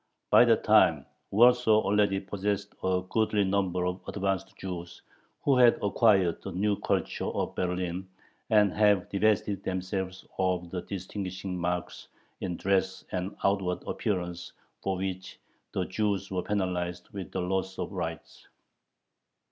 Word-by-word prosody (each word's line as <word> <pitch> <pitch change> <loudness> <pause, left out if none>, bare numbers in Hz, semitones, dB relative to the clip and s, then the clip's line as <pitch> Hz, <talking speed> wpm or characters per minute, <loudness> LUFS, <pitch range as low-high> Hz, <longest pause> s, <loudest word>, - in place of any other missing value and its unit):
By - - +8
that - - +3
time - - +5 0.2
Warsaw 120 0 +5
already 100 -1 +2
possessed 100 +1 -3
a 95 0 +1
goodly 105 0 +2
number 95 -2 0
of 90 +1 -2
"advanced" 95 -1 -2
Jews, 85 -2 -7 0.4
who 140 - +4
had 120 -2 +6
acquired 100 -4 +3
the - - -6
new 100 +3 +1
culture - - -1
of - - -2
Berlin, 90 0 -2 0.4
and 105 -3 +4
had 105 -3 +3
divested 100 0 +1
themselves 95 0 -3
of 90 -2 0
the 90 - -3
distinguishing 95 -1 -5
marks 90 0 -3 0.3
in 90 -3 -3
dress 95 -1 0
and 95 +2 -3
outward 95 -2 +1
appearance 90 -3 -3 0.3
for 95 -1 -1
which 95 0 -5 0.3
the 95 - -1
Jews 100 0 -1
were 90 -1 0
penalized 90 -3 -2
with 100 -2 -7
the 95 - -2
loss 95 +1 -2
of - - -4
rights. - - -6
95 Hz, 135 wpm, -29 LUFS, 90-100 Hz, 0.4 s, By